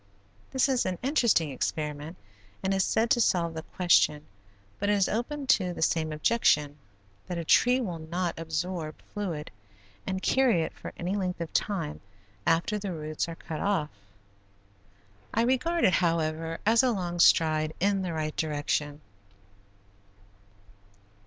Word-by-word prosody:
This 265 0 +2
is 260 -3 +1
an 185 -1 -2
interesting 235 - +2
experiment 150 +4 -3 0.5
and 190 0 +1
is 190 0 +2
said 225 +1 +1
to 240 - +4
solve 170 -6 +2
the 160 - -5
question, 160 -4 +2 0.5
but 205 - 0
it - - +4
is 200 -2 +3
open 275 +6 -3
to 185 -10 +2
the 160 - -2
same 160 -1 +1
objection, 150 -4 +2 0.5
that 180 - -4
a 170 - -4
tree 250 +9 +4
will 180 -9 -3
not 170 +2 -3
absorb 160 0 -3
fluid 175 -8 -4 0.6
and 190 0 -1
carry 250 -11 +3
it - - -5
for - - -9
any 180 +3 -2
length 185 -3 -2
of 170 -1 -5
time 165 -8 -2 0.5
after 170 +6 +2
the 200 -2 -4
roots 155 0 -3
are 165 - -6
cut 160 -1 -7
off. 195 -7 0 1.4
I 230 - +3
regard 260 +8 +1
it, 185 - +4
however 165 -1 0
as 225 +2 +5
a 260 - +2
long 175 -6 -2
stride 155 -2 +4
in 195 +1 +2
the 180 -2 -3
right 155 -1 -3
direction. 150 -1 -2
175 Hz, 150 wpm, -28 LUFS, 155-205 Hz, 1.4 s, as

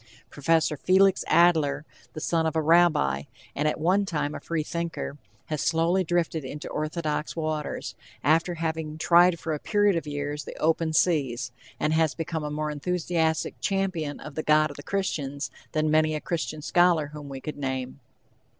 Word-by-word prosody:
Professor 155 +1 +1 0.5
Adler, 160 -4 +3 0.3
the - - -6
son 160 +1 +1
of 160 - -3
a 160 - +2
rabbi, 155 - +4 0.3
and 150 +2 0
at 150 - -1
one 185 +6 +3
time 150 -6 -2
a - - -5
freethinker, 165 -2 -3 0.3
has 155 -3 -3
slowly 170 +3 +2
drifted 170 -2 0
into 145 +3 -6
orthodox 155 0 -2
waters, 155 -2 -3 0.3
after 165 +4 +2
having 160 -1 -3
tried 175 +1 +5
for 160 - -3
a 150 - -3
period 205 +1 +2
of 165 -2 -2
years 145 0 -3
the - - -9
open 160 0 +1
seas, 135 -8 +1 0.3
and 155 - +1
has 160 -1 +2
become 165 -1 -3
a 150 - -3
more 150 0 -2
enthusiastic 160 +1 -1
champion 185 -7 -1
of 150 - -9
the 155 - -2
god 155 -1 +3
of - - -11
the - - -7
Christians 145 -6 -3 0.2
than 155 0 +1
many 155 0 +3
a - - -2
Christian 155 -2 -3
scholar 170 -4 +3
whom 150 -2 -8
we 135 -1 -6
could 150 +2 -6
name. 130 -1 -4
155 Hz, 170 wpm, -26 LUFS, 150-170 Hz, 0.5 s, tried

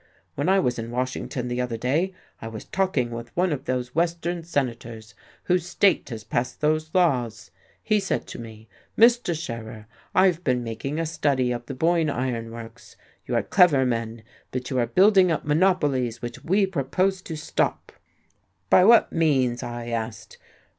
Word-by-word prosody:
When 145 +5 -1
I 195 - +5
was 125 -9 0
in 115 0 -5
Washington 125 0 -3
the 120 0 -2
other 120 -2 -3
day 145 +11 0 0.3
I 115 - -6
was 110 -1 -8
talking 180 -11 0
with 115 0 -6
one 180 -2 +2
of 140 - -6
those 125 -1 -2
Western 170 +1 -1
senators 120 -7 -4 0.3
whose 180 -1 0
state 190 -2 +2
has 110 -3 -6
passed 120 +3 -2
those 155 +1 +1
laws. 125 -11 +1 0.3
He 215 -1 +2
said 195 - -2
to - - -8
me, 110 -1 -11 0.3
'Mr. 230 -8 +4
Scherer, 115 -7 -7 0.3
I've 180 -2 +3
been 125 -4 +1
making 120 +6 -4
a 165 - 0
study 140 -5 0
of 120 0 -5
the 135 - -5
Boyne 165 +2 +2
Iron 120 -4 -2
Works. 115 0 -11 0.3
You - - -1
are - - +2
clever 170 -8 +4
men, 115 -2 -3 0.3
but 125 0 -5
you 130 - +1
are 120 - +1
building 190 - +5
up 155 - -2
monopolies 150 -7 +1
which 120 -1 -7
we 195 +4 +3
propose 185 +3 -1
to 165 - -7
stop.' 155 - -2 0.8
'By 185 - +7
what 230 +1 +6
means?'" 130 -7 +2
I 120 0 -6
asked. 110 -1 -5
130 Hz, 170 wpm, -24 LUFS, 120-175 Hz, 0.8 s, By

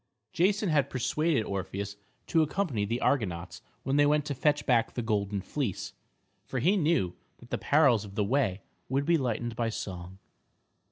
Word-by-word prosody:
Jason 195 +3 +2
had 150 -3 +2
persuaded 140 +1 +1
Orpheus 100 0 -4 0.3
to 165 - +3
accompany 150 - 0
the 115 +4 -1
Argonauts 90 -9 -1 0.2
when 135 +2 +1
they 145 - +6
went 150 0 +2
to 145 - -2
fetch 145 +3 +1
back 120 -4 +2
the 120 - -2
golden 100 -3 -1
fleece, 120 -2 -3 0.5
for 130 - -5
he 170 - +3
knew 155 - +2 0.2
that - - -17
the - - -1
perils 140 -8 +4
of 100 -2 -10
the 105 - +1
way 105 -4 +1 0.3
would 135 +2 +1
be 170 0 +3
lightened 120 -2 -2
by 115 0 0
song. 95 -4 -6
125 Hz, 170 wpm, -29 LUFS, 100-150 Hz, 0.5 s, they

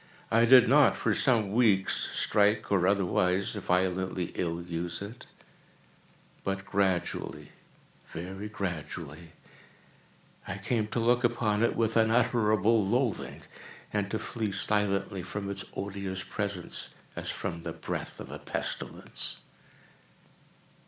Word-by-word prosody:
I 115 +1 +5
did 125 0 +8
not, 145 +3 +5
for - - +1
some 115 -7 +2
weeks, 105 -4 +3
strike, 105 +1 +2
or 90 -2 +3
otherwise 95 -1 +2
violently 90 0 0
ill 85 -1 -2
use 85 0 -4
it; 110 +6 -9 1.2
but 95 0 -2
gradually—very 95 0 -4
gradually—I 85 0 -9
came 110 +1 -1
to 115 - -2
look 120 +2 +3
upon 115 -3 +1
it 115 - +2
with 115 0 +1
unutterable 110 -2 +3
loathing, 120 +2 -1 0.5
and 100 -1 0
to 110 - -1
flee 110 -2 -3
silently 100 -1 +2
from 100 +2 -4
its 100 -1 -2
odious 95 -1 -4
presence, 100 -4 -4 0.3
as - - -3
from 85 - -3
the - - -4
breath - - -5
of - - -8
a - - -7
pestilence. - - -4
100 Hz, 110 wpm, -29 LUFS, 95-110 Hz, 1.2 s, did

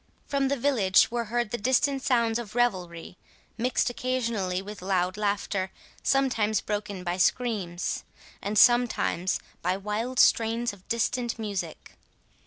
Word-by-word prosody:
From 275 -1 0
the 280 +1 0
village 230 -8 +3
were 235 -1 -1
heard 235 0 -1
the 240 - -2
distant 265 +4 +2
sounds 235 -3 +2
of 225 -2 -8
revelry, 180 -8 -1 0.4
mixed 240 +1 0
occasionally 230 -8 -1
with 205 0 -8
loud 185 -1 0
laughter, 200 -2 -1 0.3
sometimes 235 -6 +2
broken 205 -3 -4
by 175 0 -2
screams, 190 -4 0 0.4
and 210 +1 -2
sometimes 240 -7 +3 0.2
by 180 +2 0
wild 215 +6 -3
strains 230 0 +3
of 190 -2 -17
distant 235 +1 0
music. 200 -7 -5
220 Hz, 130 wpm, -27 LUFS, 190-240 Hz, 0.4 s, village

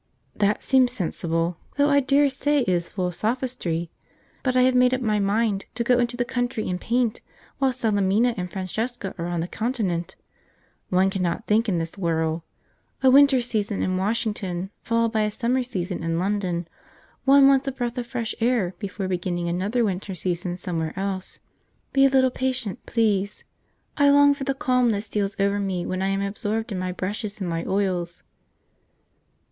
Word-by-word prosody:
"That 205 0 +1
seems 260 -2 +4
sensible, 165 -4 -2 0.2
though 285 0 +4
I 285 - +5
dare 280 +1 +3
say 285 +1 +1
it - - -2
is 175 -2 0
full 185 -2 -2
of 180 - -2
sophistry; 215 -7 -2 0.5
but 255 -1 0
I 250 - +6
have 255 0 +4
made 250 0 +4
up 255 - -4
my 215 -3 +1
mind 200 0 +1
to 235 - 0
go 245 +1 +3
into 240 0 0
the 245 - 0
country 245 -2 -2
and 180 0 -3
paint 235 -1 0 0.4
while 270 -1 +3
Salemina 220 -1 +2
and 180 -2 -4
Francesca 200 +3 -3
are 170 - -2
on 175 -1 -1
the 170 - -3
Continent. 205 -7 -2 0.7
One 190 +1 +3
cannot 180 -3 -2
think 220 +2 +2
in 180 - +1
this 165 +4 -4
whirl. 160 -2 0 0.6
A 260 - +6
winter 275 -1 +6
season 215 -4 -1
in 185 - 0
Washington 195 -3 -2
followed 230 -1 +1
by 220 -1 +1
a 210 - +1
summer 245 +4 0
season 190 -8 -4
in 165 0 -1
London, 180 -2 -1 0.6
one 275 0 +7
wants 275 0 +4
a - - +1
breath 245 -1 -3
of 240 - -5
fresh 235 -2 -3
air 225 -6 +1
before 195 -1 -4
beginning 175 -1 -2
another 200 +8 0
winter 190 -1 -3
season 175 0 -2
somewhere 165 -3 -3
else. 190 -1 -3 0.6
Be 275 0 +5
a - - +6
little 260 -1 +3
patient, 255 -4 -2
please. 205 -3 0 0.5
I 285 -1 +5
long 285 0 +6
for 280 -1 -6
the 275 - 0
calm 250 -2 +2
that 205 0 -2
steals 205 -2 -2
over 200 +1 +2
me 190 -3 -2
when 185 0 -2
I 190 - +1
am 195 0 0
absorbed 215 +3 -2
in 190 - -2
my 185 0 -2
brushes 200 +3 -4
and 190 - -3
my 165 -1 -2
oils." 185 -3 -1
205 Hz, 185 wpm, -24 LUFS, 185-250 Hz, 0.7 s, one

